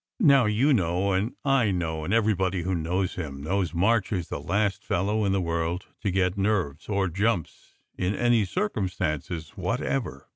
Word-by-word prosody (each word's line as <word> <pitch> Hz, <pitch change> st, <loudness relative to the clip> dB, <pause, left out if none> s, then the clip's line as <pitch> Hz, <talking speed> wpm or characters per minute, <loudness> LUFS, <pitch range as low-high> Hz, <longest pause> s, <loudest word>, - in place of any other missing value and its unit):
Now 140 Hz, -, +6 dB
you 115 Hz, +8 st, +3 dB
know, 95 Hz, -2 st, +1 dB
and 95 Hz, +5 st, 0 dB
I 135 Hz, -6 st, +3 dB
know, 80 Hz, -4 st, -2 dB
and 80 Hz, -, -3 dB
everybody 95 Hz, -5 st, +1 dB
who 95 Hz, +2 st, -1 dB
knows 90 Hz, +2 st, -1 dB
him 70 Hz, -5 st, -6 dB
knows 90 Hz, +1 st, 0 dB
March 105 Hz, +4 st, +2 dB
is 90 Hz, -5 st, -2 dB
the -, -, -3 dB
last 100 Hz, 0 st, 0 dB
fellow 105 Hz, +4 st, 0 dB
in 100 Hz, -, +1 dB
the 95 Hz, -, +2 dB
world 85 Hz, +1 st, -2 dB, 0.2 s
to 105 Hz, -, 0 dB
get 95 Hz, +1 st, 0 dB
nerves 95 Hz, -8 st, -1 dB
or 100 Hz, -2 st, +1 dB
jumps 95 Hz, 0 st, -2 dB, 0.2 s
in 95 Hz, +3 st, 0 dB
any 120 Hz, 0 st, +3 dB
cir 185 Hz, -, 0 dB
cumstances 85 Hz, -, -3 dB
whatever. 70 Hz, -1 st, -3 dB
95 Hz, 175 wpm, -26 LUFS, 85-105 Hz, 0.2 s, Now